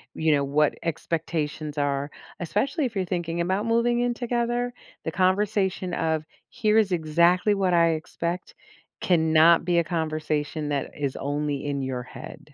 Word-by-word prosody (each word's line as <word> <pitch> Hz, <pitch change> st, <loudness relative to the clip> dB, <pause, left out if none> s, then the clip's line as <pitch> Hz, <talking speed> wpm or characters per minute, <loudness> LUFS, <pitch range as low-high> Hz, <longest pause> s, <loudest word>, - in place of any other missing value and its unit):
you 160 Hz, 0 st, +2 dB
know, 145 Hz, -1 st, +3 dB
what 145 Hz, +2 st, +2 dB
expectations 155 Hz, -2 st, -3 dB
are 140 Hz, 0 st, 0 dB, 0.3 s
especially 255 Hz, -, 0 dB
if 235 Hz, -4 st, -4 dB
you're 190 Hz, -2 st, 0 dB
thinking 170 Hz, -2 st, -3 dB
about 190 Hz, +5 st, 0 dB
moving 235 Hz, +1 st, +2 dB
in 245 Hz, 0 st, +1 dB
together, 240 Hz, 0 st, -1 dB, 0.3 s
the 160 Hz, -, -3 dB
conversation 190 Hz, 0 st, +1 dB
of, 160 Hz, -1 st, 0 dB, 0.3 s
"Here 215 Hz, -3 st, +1 dB
is 210 Hz, -3 st, +3 dB
exactly 170 Hz, +5 st, +3 dB
what 190 Hz, -3 st, +1 dB
I 170 Hz, -1 st, +5 dB
expect," 170 Hz, +2 st, -3 dB, 0.5 s
cannot 160 Hz, -1 st, +4 dB
be 175 Hz, -1 st, +3 dB
a -, -, +2 dB
conversation 155 Hz, -2 st, -2 dB
that 140 Hz, -2 st, -2 dB
is 140 Hz, -3 st, -2 dB
only 145 Hz, 0 st, -2 dB
in 140 Hz, -1 st, -2 dB
your 130 Hz, -2 st, -3 dB
head, 150 Hz, +4 st, -11 dB
170 Hz, 155 wpm, -25 LUFS, 150-195 Hz, 0.5 s, I